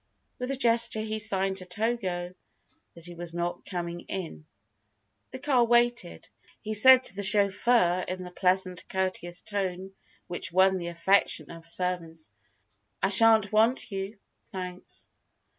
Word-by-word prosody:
With 250 +1 -4
a 275 - -1
gesture 235 -3 +2
he 215 0 -4
signed 195 -2 -1
to 185 - -4
Togo 185 -3 -3 0.6
that 170 -1 -12
he 175 - -7
was 170 0 -8
not 175 0 -4
coming 175 -2 -5
in. 165 - -7 0.8
The 260 - -8
car 260 -3 +2
waited, 240 - +1 0.2
but - - -28
he 215 0 -4
said 260 +4 +7
to 190 - 0
the 200 - -4
chauffeur 200 -2 +4
in 185 0 -5
the 180 - -10
pleasant, 185 0 -1
courteous 185 -2 -3
tone 190 -2 -4 0.3
which 175 -1 -3
won 190 +2 +4
the 180 -2 -4
affection 175 +4 +1
of 165 0 -12
servants, 165 - -4 0.7
"I 195 - +3
shan't 220 0 +5
want 225 +3 +1
you 195 +2 -5 0.3
thanks." 180 -1 -8
190 Hz, 145 wpm, -27 LUFS, 175-220 Hz, 0.8 s, said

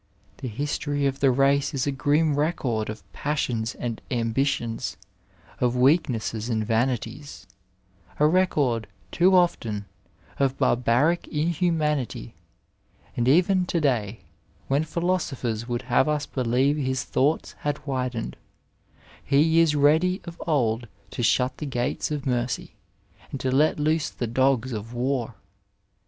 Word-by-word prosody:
The 130 - -5
history 145 +3 -2
of 135 0 -1
the 135 - +4
race 140 +3 +2
is 130 - 0
a 140 - 0
grim 145 +3 +2
record 140 -8 -1
of 110 -3 -7
passions 125 -6 -2
and 120 -2 -4
ambitions, 115 0 -1 0.6
of 125 0 +1
weak 140 +6 +4
nesses 115 -1 -3
and 110 -2 0
vanities, 120 +2 -2 0.7
a 150 - +5
record, 150 - +2 0.2
too 185 +2 +4
often, 115 - +1 0.5
of 135 -1 +1
barbaric 125 +8 +2
in 155 +2 -1
humanity, 150 - -1 0.8
and 120 0 0
even 180 +5 +4
to 170 - 0
day, 115 -8 0 0.5
when 140 +3 +1
philosophers 155 -10 -2
would 120 0 -2
have 125 +4 +2
us 150 -1 0
believe 130 +3 +1
his 130 -3 -1
thoughts 145 +4 0
had 145 0 -3
widened, 125 -4 -3 0.9
he 160 +4 +3
is 165 -3 +4
ready 160 +6 +3
as - - -7
of 170 - -15
old 120 -6 +1 0.2
to - - -4
shut 125 +3 +2
the 150 - -4
gates 120 -2 -2
of 150 -2 -3
mercy, 125 -1 -2 0.6
and 135 - -5
to 130 - -1
let 150 +4 +3
loose 155 +1 +1
the 120 - -4
dogp 130 +1 +1
of 110 +2 -6
war. 125 -2 -1
135 Hz, 140 wpm, -25 LUFS, 120-150 Hz, 0.9 s, a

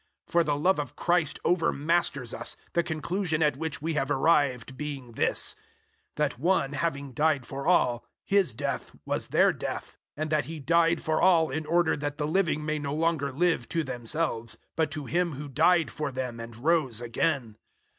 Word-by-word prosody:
005:014 - - -25
For 170 0 +4
the 150 -2 0
love 180 +4 +2
of 145 -4 -4
Christ 175 -4 +1
overmasters 165 -6 +1
us, 120 - -4 0.2
the 170 - +3
conclusion 160 +1 -1
at 150 -3 +2
which 155 0 -4
we 165 0 -1
have 140 -2 0
arrived 135 -4 +2
being 140 -3 -6
this 115 - 0 0.6
that 150 -4 -1
One 150 -3 +1
having 140 -4 -2
died 150 -2 +1
for 140 +2 -5
all, 125 -9 +3 0.2
His 195 - +2
death - - -3
was - - -1
their - - +4
death, - - -5 0.2
005:015 - - -6
and 155 - -3
that 155 -1 +2
He 165 0 -6
died 165 +3 +2
for 155 0 +1
all 165 -5 +4
in 155 +2 -3
order 170 -1 +3
that 145 0 -4
the 150 - -1
living 155 -3 +1
may 155 0 -1
no 145 0 -3
longer 160 -3 0
live 165 -3 +1
to 165 -1 0
themselves, 120 -3 -2 0.2
but 160 -1 +1
to 150 -4 -5
Him 175 +3 0
who 145 +2 -6
died 160 +4 +3
for 150 -3 -3
them 125 -2 -4
and 115 0 -8
rose 135 -3 +1
again. 120 -1 -1
150 Hz, 185 wpm, -28 LUFS, 135-165 Hz, 0.6 s, For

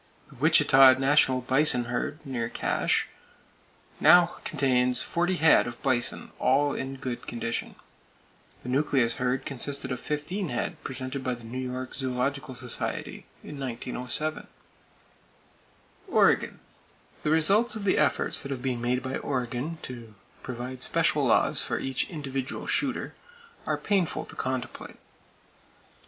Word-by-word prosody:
The - - -16
Wichita 135 -2 +7
National 135 -1 +3
Bison 130 -1 +2
herd, 145 +6 -4
near 120 -4 -3
Cache, - - 0 0.9
now 175 -1 +6
contains 125 -4 +1
forty 175 +6 0
head 160 -6 +5
of 120 0 -7
bison, 130 -3 0
all 140 +2 +2
in 135 +1 -4
good 130 -2 -6
condition. 115 0 -4 0.9
The 125 - -6
nucleus 130 -3 +1
herd 130 +1 0
consisted 140 0 -2
of 125 - -3
fifteen 155 +5 -3
head 120 - -4
presented 130 +1 -5
by 125 -1 -1
the 120 - -14
New 120 +3 -6
York 130 0 -5
Zoological 130 +1 -2
Society 125 -1 -4 0.2
in 145 - -9
1907. 125 +4 -2 1.6
Oregon: - - +3 0.6
The 150 - -1
results 195 +10 +3
of 215 - -5
the 195 - +2
efforts 150 -3 +1
that 140 - -7
have 135 -3 -4
been 125 -3 -1
made 125 +1 0
by 130 0 -3
Oregon 130 +4 -3
to 115 -4 -9 0.3
provide 125 +1 -6
special - - +2
laws - - +3
for - - -2
each 135 -1 -2
individual 135 -5 -5
shooter - - -1 0.5
are - - 0
painful 195 -5 0
to - - -11
contemplate. 130 -1 -5
130 Hz, 130 wpm, -27 LUFS, 125-145 Hz, 1.6 s, Wichita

